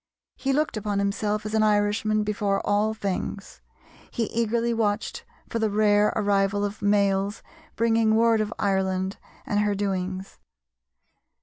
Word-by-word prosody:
He 270 - -1
looked 300 -3 0
upon 205 -1 -2
himself 205 +1 -1
as 215 - -4
an 220 - +3
Irishman 215 0 +2
before 205 -2 0
all 210 +2 +1
things. 195 -1 -4 0.5
He 235 - -2
eagerly 235 +1 +1
watched 210 -2 -1 0.2
for 230 - -3
the 220 -1 +1
rare 210 0 +3
arrival 205 -1 +1
of 205 +1 -6
mails 200 0 +1 0.3
bringing 225 -1 +2
word 225 -1 +4
of 215 0 -2
Ireland 190 -1 0 0.3
and 205 - 0
her 210 -1 +1
doings. 190 -1 -3
205 Hz, 135 wpm, -25 LUFS, 200-220 Hz, 0.5 s, word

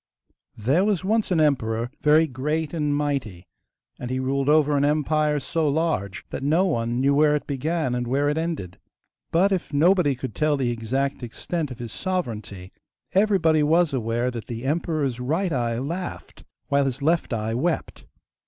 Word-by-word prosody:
There 135 - +2
was 200 -3 0
once 220 +2 +1
an 180 -3 +2
emperor, 120 -6 +1
very 155 +2 +5
great 150 +3 -2
and 150 -3 0
mighty, 135 -12 -2 0.5
and 125 - -5
he 130 0 -1
ruled 135 +1 0
over 150 -1 +4
an 140 - +2
empire 150 0 +1
so 160 +2 -1
large 140 - -1
that - - -4
no 160 +7 +2
one 120 -8 -1
knew 140 +2 +3
where 150 +1 +4
it 150 - -3
began 145 0 -1
and 125 -1 -2
where 140 +4 +1
it 145 - +1
ended. 160 - -4 0.5
But 185 +4 +3
if 185 -3 -1
nobody 160 0 +3
could 130 +1 -6
tell 150 -1 +1
the 125 -3 0
exact 130 +5 -2
extent 150 +6 -4
of 125 - -8
his 120 -2 -7
sovereignty 110 - -4 0.4
everybody 185 -6 +3
was 160 +1 +3
aware 120 0 -1
that 115 -2 -7
the 115 0 -6
emperor's 150 -4 -1
right 165 +9 -1
eye 120 -3 -1
laughed, 170 +8 -6 0.2
while 140 0 +3
his 135 +2 -4
left 165 0 +1
eye 110 -1 -2
wept. 160 +8 -2
145 Hz, 170 wpm, -24 LUFS, 125-160 Hz, 0.5 s, very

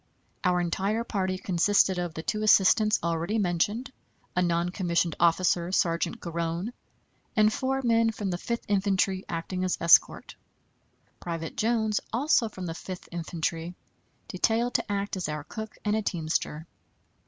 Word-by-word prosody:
Our 180 -1 +2
entire 195 +6 -1
party 190 -4 -2
consisted 190 +1 +2
of 175 -2 -3
the 160 - -5
two 215 +4 -2
assistants 215 +1 +5
already 170 +5 -1
mentioned, 205 +6 0 0.4
a 180 - +2
non 170 0 +1
commissioned 175 -3 0
officer, 170 +1 +2
Sergeant 170 -2 0
Garone, 170 +5 -3 0.6
and 215 0 +4
four 270 0 -1
men 230 -1 +3
from 205 -3 -3
the 175 - -3
Fifth 235 +4 -3
Infantry 195 -1 +1
acting 180 +2 -3
as 185 - 0
escort; 170 0 +4 0.9
Private 165 -2 -5
Jones, 220 -2 +1
also 240 -1 +2
from 185 -3 -7
the 165 - -3
Fifth 180 +2 -8
Infantry, 170 0 -3 0.5
detailed 230 +6 0
to - - -1
act 200 -1 -2
as 180 - -3
our 150 -1 -4
cook, 220 +8 -8
and 210 0 +2
a 220 - +1
teamster. 160 -4 -2
185 Hz, 145 wpm, -27 LUFS, 170-215 Hz, 0.9 s, assistants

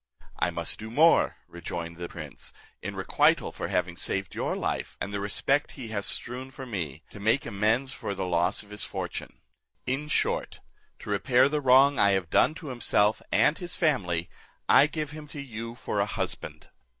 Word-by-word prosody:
"I - - +2
must - - 0
do 110 - -7
more," 155 +8 +4
rejoined 85 -1 -6
the 85 0 -5
prince, 75 -5 -8 0.3
"in - - -5
requital - - +2
for - - -4
having 90 -1 -1
saved 95 +1 -2
your - - -1
life, - - -3
and 100 - -4
the 100 - -1
respect 135 +8 +1
he 125 -5 -8
has 100 -2 0
strewn 125 +2 -1
for 135 0 -9
me, 80 - -5
to - - -10
make 110 +6 +2
amends 115 +5 +1
for 100 -6 -4
the 95 -1 -2
loss 90 +3 +1
of 105 - -18
his 105 0 -2
fortune. - - -5 0.4
In 135 +4 -2
short, 150 - 0 0.4
to - - -6
repair 125 +5 +4
the 150 +1 -1
wrong 135 +1 +6
I 100 -1 +5
have 95 -3 -1
done 155 - +4
to 160 -4 -8
himself 110 -4 +2
and 150 - +3
his 175 -1 -3
family, 90 - +1 0.4
I 145 - +7
give 150 -1 -4
him 150 0 -9
to 145 - -9
you 115 -3 -6
for - - -3
a - - +2
husband." - - -4
110 Hz, 185 wpm, -28 LUFS, 95-135 Hz, 0.4 s, I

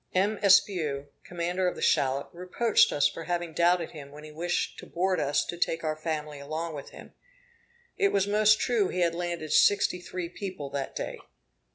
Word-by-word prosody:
M. 200 +3 +1
Espiau, 175 -8 +3 0.2
commander 175 +1 -2
of 180 - -1
the - - -8
shallop, 135 +1 +1
reproached 185 +6 +2
us 145 -1 +3
for 165 - -7
having 175 -1 -2
doubted 170 +1 +2
him 145 -4 -10
when 150 +1 -12
he 155 - -10
wished 175 +3 -2
to - - -10
board 185 +2 0
us 145 0 +1
to - - -5
take 165 -1 0
our 155 -1 -1
family 155 -2 -4
along 155 +3 -4
with 145 -2 -8
him. - - -13 0.9
It 400 -1 +3
was 195 -1 +2
most 215 +1 +4
true 230 -6 +1
he 180 - -2
had 170 -1 +2
landed 170 -2 -4
sixty 195 -3 +4
three 180 -1 -5
people 170 -5 -7
that 140 -1 -4
day. - - -5
170 Hz, 190 wpm, -28 LUFS, 155-185 Hz, 0.9 s, most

